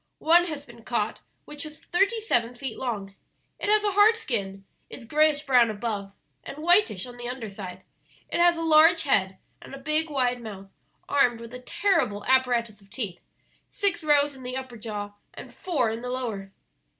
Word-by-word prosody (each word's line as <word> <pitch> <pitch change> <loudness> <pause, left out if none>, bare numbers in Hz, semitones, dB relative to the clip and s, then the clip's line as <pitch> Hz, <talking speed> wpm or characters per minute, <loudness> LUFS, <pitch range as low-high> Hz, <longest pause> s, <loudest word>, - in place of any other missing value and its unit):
One 345 +2 +4
has 300 -4 -6
been 235 -3 -15
caught 220 -2 -2 0.2
which 295 -1 -8
was 305 -1 -9
thirty 395 +6 +1
seven 245 - 0
feet 250 -2 -5
long. 205 -6 -4 0.5
It - - -2
has 425 0 +4
a 415 - +1
hard 415 +3 +5
skin, 195 - -4 0.2
is 250 - -10
grayish 300 +3 +3
brown 245 -4 +5
above 205 -2 -4 0.3
and - - -8
whitish 335 - +3
on 245 -1 -11
the 240 0 -6
under 250 -3 -5
side. 185 -2 -8 0.4
It - - -3
has 345 -1 +5
a 330 - -3
large 325 +1 +6
head 190 -9 +2 0.2
and - - -10
a - - -8
big 305 +3 0
wide 250 -4 0
mouth 195 -3 -9 0.4
armed 250 -5 +2
with 230 +1 -10
a 250 - -7
terrible 250 - 0
apparatus 240 -5 +1
of 195 - -22
teeth 195 -6 -4 0.5
six 400 -4 0
rows 290 -1 +4
in 265 - -13
the 255 +1 -4
upper 260 -2 -7
jaw, 210 -2 -6 0.2
and - - -10
four 290 - 0
in 225 +1 -5
the 250 - -5
lower." 225 -7 -4
250 Hz, 185 wpm, -26 LUFS, 220-310 Hz, 0.5 s, large